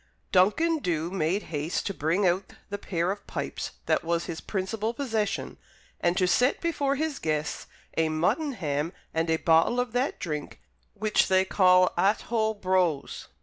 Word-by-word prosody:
Duncan 310 - +3
Dhu 170 - -1
made 190 +2 0
haste 150 +3 -2
to 200 - -2
bring 170 +5 +1
out 185 +2 0 0.2
the 205 - -3
pair 175 -2 -1
of 205 0 -7
pipes - - -4
that - - +1
was 170 0 0
his 170 -2 -5
principal 215 +4 -2
possession, 220 -7 -2 0.4
and 175 +1 +1
to 185 - +3
set 245 +9 +3
before 290 -5 0
his 310 0 -2
guests 155 -1 -2 0.3
a 160 -1 +2
muttonham 165 - -1 0.2
and 160 0 0
a 160 - +3
bottle 165 +10 +3
of 245 -1 -1
that 250 +4 -1
drink 150 -7 -5 0.4
which 210 +1 +2
they 190 0 +3
call 185 -1 +4
Athole 220 +3 +1
brose. 185 -6 0
185 Hz, 155 wpm, -27 LUFS, 165-220 Hz, 0.4 s, call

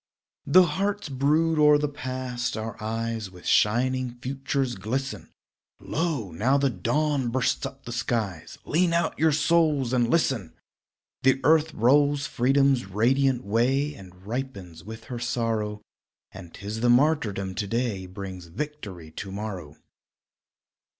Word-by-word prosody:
Though 180 +6 +7
hearts 200 0 -2
brood 155 +4 +2
o'er 150 0 +7
the 150 0 0
past, 130 -4 -4
our 110 0 -4
eyes 115 -1 -3
With 90 -1 -15
shining 125 +3 +2
futures 135 0 -2
glisten; 125 +7 -4 0.5
Lo! 150 - -2
now 120 +12 +2
the 140 -1 +2
dawn 140 - 0
bursts 130 +2 0
up 135 0 -14
the 120 - -6
skies: 110 -7 -3
Lean 170 +2 +2
out 170 0 0
your 160 0 +4
souls 150 -4 +2
and 120 -2 +2
listen! 130 - 0 0.7
The 130 0 +3
earth 155 +2 +4
rolls 140 +4 +3
freedom's 135 0 +2
radiant 125 +5 +2
way, 130 +7 +1
And 95 -3 -14
ripens 100 -9 -5
with 110 +2 -9
her 120 0 -6
sorrow; 115 -3 -2 0.5
And 95 -3 -11
'tis 105 +4 -6
the 120 - +3
martyrdom 120 -8 +2
to 100 - -3
day 115 -4 -2
Brings 95 -1 -8
victory 100 - -7
to 95 +4 -7
morrow. 95 -7 -6
125 Hz, 135 wpm, -26 LUFS, 105-140 Hz, 0.7 s, Though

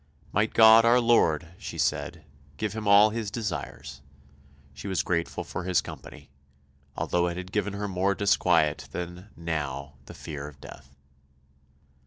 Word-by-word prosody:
Might 105 +2 0
God 110 0 +8
our 120 +2 +5
Lord, 85 -9 +2
she 105 - -7
said, 85 -2 -2 0.3
give 105 +5 -3
him 110 -1 -5
all 100 +2 +7
his 110 -2 -3
desires; 85 - -5 0.7
she 70 +9 -9
was 95 -8 0
grateful 85 0 -2
for 90 - -6
his 90 -1 +2
company, - - -10 0.7
although 90 0 0
it 85 0 -4
had 90 0 -7
given 105 -1 -1
her 100 +1 -3
more 95 +1 0
disquiet 85 -8 +2
than, 90 +3 -6
now, 75 -4 -4
the - - -10
fear 75 -2 -7
of 75 -2 -13
death. 70 -1 -13
90 Hz, 150 wpm, -27 LUFS, 75-105 Hz, 0.7 s, God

